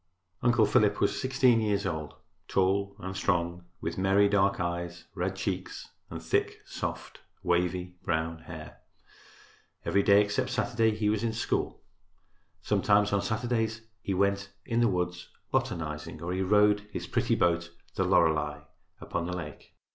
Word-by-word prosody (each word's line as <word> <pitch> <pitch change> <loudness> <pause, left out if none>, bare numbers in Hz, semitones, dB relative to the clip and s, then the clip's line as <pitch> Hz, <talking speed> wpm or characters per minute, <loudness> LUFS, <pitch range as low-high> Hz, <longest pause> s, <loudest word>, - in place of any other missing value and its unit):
Uncle 120 -2 +4
Philip 105 0 +3
was 100 - +1
16 130 -3 +3
years 105 -2 0
old, 80 -4 -3 0.3
tall 100 +1 +1
and 95 -1 -6
strong, 85 -2 0 0.2
with 85 +2 -3
merry 95 +2 +4
dark 100 -1 +2
eyes, 85 0 -3
red 95 0 -2
cheeks 95 -1 -4 0.2
and - - -6
thick, - - 0
soft, - - -5 0.2
wavy, 90 +1 0
brown 80 +1 -1
hair. - - -10 1.1
Every 100 - +3
day 100 +1 +6
except 105 0 -1
Saturday 115 -3 +1
he 105 -1 0
was 105 +1 +1
in 115 -1 0
school. 115 - -2 0.8
Sometimes 105 0 +3
on 100 - +3
Saturdays 115 -1 -1 0.2
he 95 - -2
went 100 +1 +1 0.2
in 115 0 0
the 120 - +5
woods 90 -2 -2 0.2
botanizing 75 -1 -2
or 85 +3 -3
he 95 - -1
rowed 105 +2 +4
his - - -4
pretty - - +1
boat, 85 -1 +1 0.2
"The - - 0
Lorelei," 75 -2 +2 0.4
upon 85 0 -3
the 90 0 -3
lake. 75 -4 -9
95 Hz, 145 wpm, -29 LUFS, 85-105 Hz, 1.1 s, day